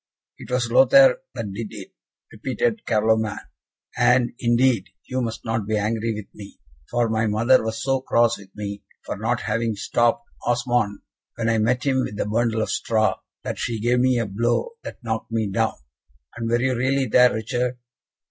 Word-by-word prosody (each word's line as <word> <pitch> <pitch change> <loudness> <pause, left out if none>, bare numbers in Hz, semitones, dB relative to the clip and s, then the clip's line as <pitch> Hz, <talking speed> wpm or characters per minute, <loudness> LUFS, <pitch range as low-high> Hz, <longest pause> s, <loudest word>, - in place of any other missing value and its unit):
"It - - -10
was 125 -2 0
Lothaire 275 - +6 0.2
that 100 -3 -4
did 110 +2 -4
it," - - -10 0.4
repeated 170 - -2
Carloman, 110 -1 +1 0.6
"and, 125 -1 +3
indeed, 120 -3 +2 0.2
you 130 0 -2
must 115 -2 -4
not 110 -2 -2
be 110 0 +1
angry 110 +2 -1
with 105 -1 -6
me, 100 -1 -12 0.3
for 120 -1 +1
my 110 0 0
mother 115 +5 +3
was 110 0 -3
so 135 -1 +1
cross 120 -3 +2
with 100 -1 -14
me 100 -1 -5 0.2
for - - -4
not - - -1
having 115 0 -1
stopped 120 +3 +1 0.2
Osmond 120 -4 0 0.3
when 115 0 -1
I 115 -1 +2
met 125 +3 +1
him 130 -2 +2
with 105 - -5
the - - -1
bundle 110 +1 0
of - - -3
straw, 110 -1 +1 0.2
that - - -4
she 115 -2 -2
gave 120 +3 +2
me 130 0 +3
a 115 - 0
blow, 120 - 0
that - - -9
knocked 110 -1 -3
me 115 -1 0
down. 95 - 0 0.6
And 115 -1 -3
were 120 +1 +2
you 130 +1 +1
really 130 +2 +1
there, 125 +1 +5
Richard?" 125 +3 -2
115 Hz, 180 wpm, -23 LUFS, 110-125 Hz, 0.6 s, Lothaire